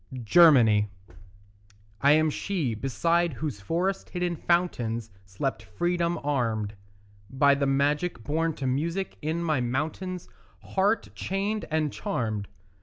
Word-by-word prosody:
GERMANY 115 -7 +6 1.1
I 140 +1 +6
am 155 0 +3
she 160 - -2
beside 165 +8 +1
whose 130 -6 -4
forest 180 - -1
hidden 180 -1 -2
fountains 120 - 0
Slept 105 +6 -3
freedom 170 - -1
armed, 115 -7 -1 0.6
By 140 +3 +4
the 140 0 0
magic 145 0 0
born 160 +4 0
to 135 - -5
music 165 +9 -2
in 160 +3 -2
my 155 -6 +1
mountains 155 +9 -3 0.4
Heart 200 +3 +1
chained 200 +3 -2
and 155 -2 0
charmed. 110 - -2
150 Hz, 115 wpm, -27 LUFS, 125-175 Hz, 1.1 s, GERMANY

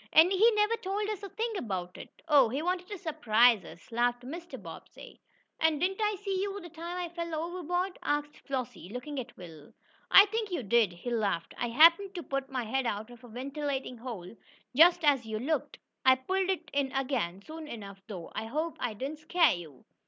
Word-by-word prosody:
"And 325 +4 +7
he 425 +5 +5
never 420 +2 +3
told 405 +2 -2
us 425 -2 -3
a 400 - -7
thing 455 +4 -2
about 185 - -4
it." - - -12
"Oh, 280 -6 +6
he 275 +6 -2
wanted 360 +1 -1
to 410 - -6
surprise 245 - +3
us," 170 +6 -13
laughed 240 +1 +1
Mr. 335 +7 -7
Bobbsey. - - -12 0.4
"And 320 -2 +3
didn't 380 +5 0
I 420 -1 +2
see 385 -1 -2
you, 400 0 -3
the 345 -2 -10
time 340 +2 -6
I 355 -1 -2
fell 335 -1 -3
overboard?" 355 +3 -2
asked 295 0 -2
Flossie, 250 -8 -5
looking 260 +5 -5
at 245 -1 -8
Will. 160 -5 -12 0.4
"I 395 - +10
think 440 +1 -2
you 345 -8 -2
did," 220 -1 +3
he 175 +8 -6
laughed. 195 -8 -1
"I 240 - -2
happened 335 - +6
to 350 - -4
put 275 -1 -3
my 260 -2 -2
head 255 +3 -1
out 215 +3 -3
of 240 0 -14
a - - -11
ventilating 270 +1 -4
hole 230 -6 -7 0.4
just 340 +3 +6
as 275 -6 +3
you 220 -1 -3
looked. 290 +8 -2 0.3
I 260 0 +7
pulled 375 +8 -1
it 380 - -2
in 280 -2 0
again, 245 -9 -1
soon 315 +3 -8
enough, 200 -7 -8
though. 185 -6 -7
I 220 - -3
hope 310 +6 -2
I 230 -3 -2
didn't 275 +7 -5
scare 330 +1 +4
you." 160 -7 -9
285 Hz, 205 wpm, -30 LUFS, 235-355 Hz, 0.4 s, I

